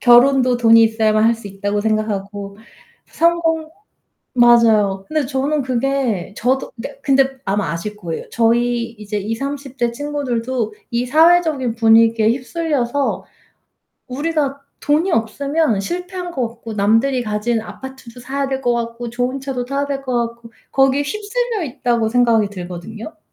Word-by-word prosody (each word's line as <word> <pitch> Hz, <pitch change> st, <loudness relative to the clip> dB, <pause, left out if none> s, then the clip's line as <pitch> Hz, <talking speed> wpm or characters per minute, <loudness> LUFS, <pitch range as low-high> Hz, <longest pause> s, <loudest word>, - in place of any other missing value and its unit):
결혼도 250 Hz, 0 st, +5 dB
돈이 230 Hz, -1 st, +6 dB
있어야만 220 Hz, -1 st, +2 dB
할 230 Hz, +1 st, +4 dB
수 225 Hz, -3 st, -10 dB
있다고 205 Hz, +1 st, -2 dB
생각하고 205 Hz, -2 st, -2 dB, 0.5 s
성공 325 Hz, -1 st, +1 dB, 0.7 s
맞아요. 220 Hz, -5 st, +4 dB
근데 310 Hz, -4 st, 0 dB
저는 280 Hz, +2 st, 0 dB
그게 255 Hz, -6 st, -1 dB
저도 260 Hz, +3 st, 0 dB
그러니까 230 Hz, +5 st, -8 dB
근데 270 Hz, -1 st, +2 dB
아마 195 Hz, -4 st, -1 dB
아실 210 Hz, +5 st, -5 dB
거예요. 170 Hz, -5 st, -6 dB
저희 235 Hz, 0 st, +1 dB
이제 210 Hz, -1 st, -5 dB
20-30 270 Hz, +6 st, -4 dB
대 240 Hz, -2 st, 0 dB
친구들도 255 Hz, -5 st, -3 dB, 0.2 s
이 240 Hz, +1 st, -1 dB
사회적인 310 Hz, -5 st, +3 dB
분위기에 225 Hz, -1 st, +4 dB
휩쓸려서 275 Hz, 0 st, -1 dB, 0.8 s
우리가 285 Hz, +1 st, -1 dB, 0.2 s
돈이 315 Hz, +6 st, +1 dB
없으면 275 Hz, 0 st, 0 dB
실패한 360 Hz, -, -5 dB
것 255 Hz, -7 st, -1 dB
같고 230 Hz, 0 st, -10 dB
남들이 225 Hz, +6 st, +2 dB
가진 220 Hz, +1 st, -1 dB
아파트도 255 Hz, 0 st, -10 dB
사야 275 Hz, +2 st, -2 dB
될 265 Hz, 0 st, -3 dB
것 245 Hz, -1 st, +1 dB
같고 235 Hz, 0 st, -4 dB
좋은 250 Hz, +3 st, -2 dB
차도 260 Hz, -2 st, -3 dB
타야 275 Hz, +2 st, -1 dB
될 280 Hz, -1 st, -3 dB
것 255 Hz, -2 st, -3 dB
같고 235 Hz, 0 st, -16 dB, 0.2 s
거기에 270 Hz, +1 st, +3 dB
휩쓸려 425 Hz, +6 st, -2 dB
있다고 240 Hz, -4 st, 0 dB
생각이 230 Hz, -3 st, +3 dB
들거든요. 185 Hz, -, -8 dB
245 Hz, 310 characters per minute, -19 LUFS, 225-275 Hz, 0.8 s, 돈이